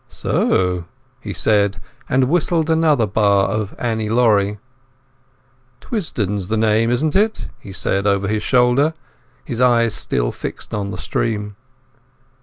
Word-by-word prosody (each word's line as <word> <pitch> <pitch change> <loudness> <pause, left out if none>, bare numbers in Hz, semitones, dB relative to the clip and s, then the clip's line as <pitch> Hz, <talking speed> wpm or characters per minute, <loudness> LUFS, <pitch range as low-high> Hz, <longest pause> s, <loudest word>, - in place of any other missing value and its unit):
"So," 90 -2 0 0.3
he 110 -4 -7
said, 100 +3 +1 0.3
and 130 0 +2
whistled 165 +1 +1
another 155 -7 +3
bar 100 -1 +2
of 105 0 -3
"Annie 110 -3 -2
Laurie". 105 -3 +2 1.2
"Twisdon's 105 - -3
the 110 +2 -1
name, 110 +1 +2
isn't 145 +6 0
it?" 215 +3 +1
he 100 - -11
said 95 +2 0
over 100 0 +1
his 110 +1 -1
shoulder, 130 +5 +2 0.5
his 120 - -4
eyes 115 -3 +3
still - - -1
fixed - - -7
on 100 -1 -2
the 90 - -6
stream. 105 +5 -3
110 Hz, 130 wpm, -19 LUFS, 100-125 Hz, 1.2 s, another